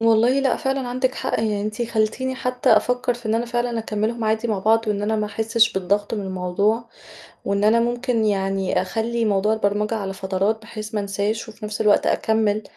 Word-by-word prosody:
والله 230 +4 +4
لأ، 275 - +2
فعلًا 270 -3 -2
عندِك 255 +1 0
حق. - - -2
يعني 215 -2 0
أنتِ 210 +3 -3
خلّتيني 235 +3 -1
حتى 250 -2 +2
أفكّر، 245 +3 +1
في 240 -1 -10
إن 215 - +1
أنا 235 +1 0
فعلًا 240 0 -1
أكملّهم 220 +1 -2
عادي 220 +2 0
مع 215 -3 0
بعض 225 +3 +2
وإن 205 -1 0
أنا 220 +1 0
ما 215 -1 -1
أحسّش 225 +2 +2
بالضغط 200 +3 0
من 210 - -3
الموضوع، 195 +5 0 0.6
وإن 200 +1 0
أنا 225 +2 +5
ممكن 240 -1 0
يعني 195 -2 0
أخلّي 230 +1 -1
موضوع 210 0 +2
البرمجة 210 0 0
على 195 -3 -3
فترات، 195 +3 -1
بحيث 215 -1 -8
ما 210 - +1
أنساش 205 +3 -2
وفي 220 0 -10
نفس 210 0 -5
الوقت 210 -2 +4
أكمِّل 215 -1 +1
220 Hz, 195 wpm, -22 LUFS, 205-235 Hz, 0.6 s, أنا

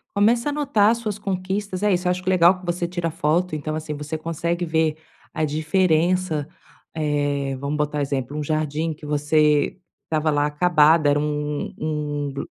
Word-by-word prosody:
Começa 230 +5 +3
a - - -1
anotar 275 -8 +3
as 235 - -1
suas 215 -3 -4
conquistas 190 0 -3
é 210 - +3
isso, 180 0 0
eu - - +3
acho 180 0 -3
q 185 - -1
legal 180 0 +5
que 180 - -12
você 175 0 -1
tira 175 -2 -3
foto, 165 +1 0
então, 155 +1 -3
assim, 155 -1 -4
você 150 +2 -5
consegue 170 +2 -2
ver 160 -1 +1 0.4
a 155 - -1
diferença, 160 0 +1 0.5
eh, 145 -3 -1
vamos 140 +2 -3
botar 150 0 -1
exemplo: 140 0 -2
um 150 - -2
jardim 155 +1 -1
que 150 - -13
você 150 +1 +2 0.3
estava 155 -1 0
lá 145 0 +2
acabado, 155 0 +4
era 145 0 +3
um 150 0 -2
um 150 -2 -3
g - - -4
155 Hz, 180 wpm, -23 LUFS, 150-180 Hz, 0.5 s, legal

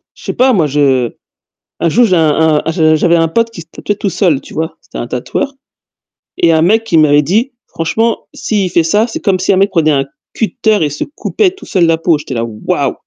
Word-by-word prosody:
Je - - -17
sais - - -3
pas, 255 +1 +3
moi 170 -8 +2
je 135 -4 +1 0.7
un 170 - +1
jour 240 +9 +3
j'ai 185 -5 +2
un 160 -1 +2
un 160 - 0
je 155 -2 +3
j'avais 170 +2 +2
un 165 -1 +2
pote 230 +8 0
qui 180 - -9
se 160 - -14
tatouait 205 - -3
tout 200 0 -2
seul, 170 -8 +1
tu - - -14
vois? 160 +1 -4
C'était - - -11
un 120 - -4
tatoueur 200 - -3 0.8
et 170 - +3
il - - +3
y - - +5
a 160 - +3
un - - +2
mec 215 +7 +3
qui 175 -7 +1
m'avait 150 -1 +5
dit: 215 - 0 0.2
«Franchement, 225 +8 -2
s'il 200 -4 -1
fait 170 - +2
ça, 205 +7 +2
c'est 230 - -5
comme 190 -2 +1
si 185 - +1
un - - +1
mec 195 +1 +3
prenait 160 -5 +2
un 135 -2 +1 0.3
cutter 220 -4 0
et 150 - 0
se 145 - -4
coupait 400 -4 0
tout 385 - -14
seul 185 -5 +1
la 165 0 +2
peau», 165 -1 +1
j'étais 145 -2 -7
là: 115 -2 -2
«Waouh!» 110 -2 -2
165 Hz, 255 wpm, -13 LUFS, 155-210 Hz, 0.8 s, y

